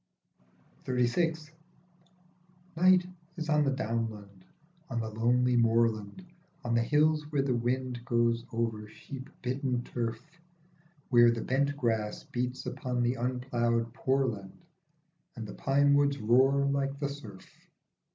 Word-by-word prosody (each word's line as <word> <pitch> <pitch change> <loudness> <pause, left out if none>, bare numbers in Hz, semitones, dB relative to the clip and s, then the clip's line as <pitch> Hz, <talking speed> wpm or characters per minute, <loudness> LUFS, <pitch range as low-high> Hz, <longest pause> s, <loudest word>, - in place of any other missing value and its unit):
39 125 -1 +2 0.3
XXXVI. 155 -1 -15 1.2
NIGHT 180 +1 +5 0.3
is 160 -1 -4
on 150 -1 +4
the 140 - +2
downland, 110 -6 -4 0.4
on 120 -3 -2
the 110 -1 -4
lonely 125 +3 +2
moorland, 115 - +1 0.4
On 120 -1 -1
the 115 - +3
hills 150 +3 +2
where 140 -2 +1
the 135 -2 0
wind 125 0 -2
goes 115 -1 +1
over 115 -2 -2
sheep 130 +5 -10
bitten 125 -1 -1
turf, 115 -2 -3 0.9
Where 120 -2 +6
the 115 -1 -1
bent 140 +2 0
grass 110 -5 -1
beats 125 +1 -4
upon 125 -1 -2
the 120 +1 +1
un 125 0 -2
ploughed 120 -2 0
poorland 130 -7 -2 0.7
And 115 - -6
the 105 - -8
pine 140 +1 +2
woods 140 0 +3
roar 130 +5 +3
like 140 0 -1
the 140 0 -1
surf. 110 -10 -10
125 Hz, 130 wpm, -30 LUFS, 115-140 Hz, 1.2 s, Where